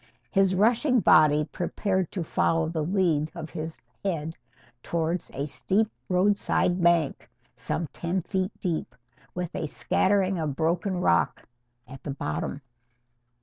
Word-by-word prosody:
His 195 -2 +3
rushing 240 +6 +3
body 155 -5 +5
prepared 190 +1 -2
to 180 - -2
follow 165 0 +1
the 160 -1 -2
lead 165 -4 +1
of 155 - -7
his 160 +1 -6 0.2
head 165 -4 -2 0.5
towards 170 +3 -2
a 140 +1 -3
steep 205 +8 0 0.2
roadside 185 -1 +2
bank 170 -4 +2 0.3
some 170 - -2
ten 175 +1 -2
feet 190 0 -1
deep, 160 -8 -2 0.4
with 180 -1 -3
a 160 - -2
scattering 190 +3 +1
of 150 -4 -2
broken 175 +4 0
rock 85 - +1 0.4
at 135 +1 -11
the - - -7
bottom. 140 0 -3
170 Hz, 130 wpm, -27 LUFS, 155-190 Hz, 0.5 s, body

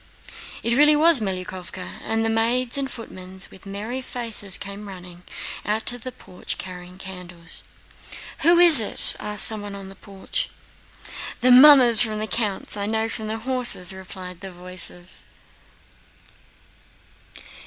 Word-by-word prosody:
It 235 0 +2
really 295 +2 +5
was 320 -1 +6
Melyukóvka, 185 -2 -6
and 225 0 -1
maids 235 +2 +1
and 275 -1 -2
footmen 190 -5 -10
with 190 - -15
merry 215 +6 -5
faces 225 -7 -3
came 200 +1 -9
running, 180 -2 -11 0.4
out 215 +1 -2
to 245 - 0
the 255 +3 -7
porch 180 -6 -8
carrying 180 0 -9
candles. 180 -3 -4 0.8
"Who 340 +2 +4
is 345 -5 +9
it?" 215 - +5
asked 210 0 +1
someone 205 -2 0
in 195 -1 -9
the 195 - -12
porch. 200 - -5 0.9
"The 250 +1 +4
mummers 255 -3 +7
from 220 -3 0
the 215 - -3
count's. 215 -3 -3
I 200 0 -3
know 220 +1 -1
by 220 - -6
the 215 +1 -4
horses," 225 -6 -3
replied 185 -1 -10
some 190 -2 -9
voices. 180 0 -3
210 Hz, 135 wpm, -22 LUFS, 185-240 Hz, 0.9 s, is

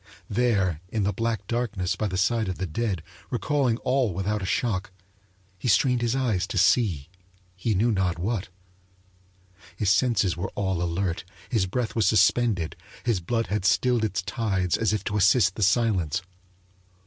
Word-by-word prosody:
There 100 -8 +1
in 110 0 -1
the 100 +1 0
black 115 -3 -2
darkness 110 -5 -1
by 110 - -1
the 95 -2 -3
side 110 +3 +1
of 95 - -4
the 95 - -2
dead, 95 0 -2 0.3
recalling 130 -2 0
all 125 -7 +1
without 100 +3 -1
a 95 - -3
shock, 105 -3 -1 0.7
he 125 - -4
strained 125 +3 +3
his 120 +1 0
eyes 110 -8 0
to - - -4
see 90 - +3 0.5
he 105 +3 -1
knew 115 +6 +2
not 95 -4 0
what. 100 +2 -2 1.3
His 100 0 +1
senses 105 -5 +2
were 90 +2 -4
all 95 -3 -1
alert, 90 +1 -1 0.3
his 110 -7 +1
breath 115 +4 -2
was 110 -3 +2
suspended, 110 -6 +2 0.3
his 115 -6 +1
blood 115 +6 -1
had 105 - 0
stilled 120 +3 +2
its 100 -3 -1
tides 95 -2 0
as 110 - +1
if 105 - -1
to 105 - -2
assist 100 +1 +4
the 110 - -7
silence. 95 - +2
105 Hz, 165 wpm, -26 LUFS, 95-115 Hz, 1.3 s, assist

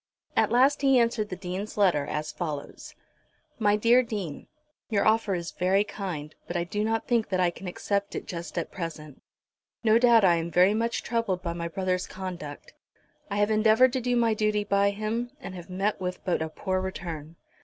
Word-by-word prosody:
At - - +3
last 265 +4 +4
he 270 -2 +5
answered 230 -3 +1
the 185 - -4
Dean's 185 +3 -5
letter 170 -8 +3
as 150 +1 -3
follows; 150 -5 -6 0.6
"MY 205 -2 +4
DEAR 235 +4 +5
DEAN, 205 - -5 0.4
"Your 210 -3 +1
offer 215 -3 +3
is 170 -1 -4
very 190 +3 +2
kind, 175 -8 -6
but 175 - -2
I 170 - 0
do 205 +4 -2
not 225 +1 -1
think 235 -3 +1
that 185 -1 0
I 180 -1 +3
can 180 +2 -9
accept 200 +3 -2
it - - -4
just 170 -1 -6
at 170 - -2
present. 155 -5 -7 0.6
No 220 0 +5
doubt 235 -4 +6
I 175 -2 +5
am 165 0 -3
very 180 +4 +4
much 230 +2 -1
troubled 215 -6 -1
by 170 -2 -2
my 170 0 -4
brother's 185 +1 -1
conduct. 180 -6 -7 0.6
I 200 - -3
have 205 +1 +2
endeavoured 220 +4 +5
to 260 - 0
do 245 0 0
my 230 -2 +3
duty 215 -1 +1
by 200 0 +2
him, 215 +4 -3
and 195 - -8
have 180 0 -9
met 195 +2 -1
with 180 0 -4
but 180 - 0
a 160 - -2
poor 185 +3 -2
return. 165 -4 -6
195 Hz, 195 wpm, -27 LUFS, 175-220 Hz, 0.6 s, doubt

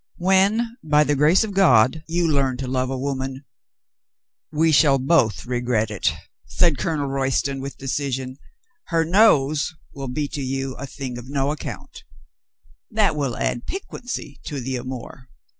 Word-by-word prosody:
"When, 200 +6 +2
by 150 -1 +4
the 145 0 +1
grace 150 +9 +4
of 215 -2 -4
God, 155 - +4
you 170 +1 +1
learn 135 -4 +1
to 130 0 -4
love 130 0 -1
a 135 - -2
woman 135 0 -4 0.3
— - - -69
" - - -69 0.3
"We 160 +1 +2
shall 145 -2 +5
both 130 - +2
regret 120 -3 0
it," 95 -5 +1 0.4
said 170 -5 +2
Colonel 155 -3 -1
Royston 135 0 -1
with 140 +1 -6
decision. 135 -1 -3 0.2
" 460 -6 -46
— 340 -1 -46
her 165 -1 +1
nose 160 -5 +3 0.2
will 135 -1 -6
be 145 +4 -2
to 145 - -5
you 135 0 -2
a 140 - -6
thing 130 -3 -6
of 125 +2 -11
no 140 0 0
ac - - -7
count— - - -8 0.5
" 65 +1 -35
"That 205 -7 +4
will 140 -5 -2
add 120 - -2
piquancy 255 - -6
to 145 - -4
the 130 +1 -3
amour." 125 +1 -8
140 Hz, 175 wpm, -22 LUFS, 130-160 Hz, 0.5 s, shall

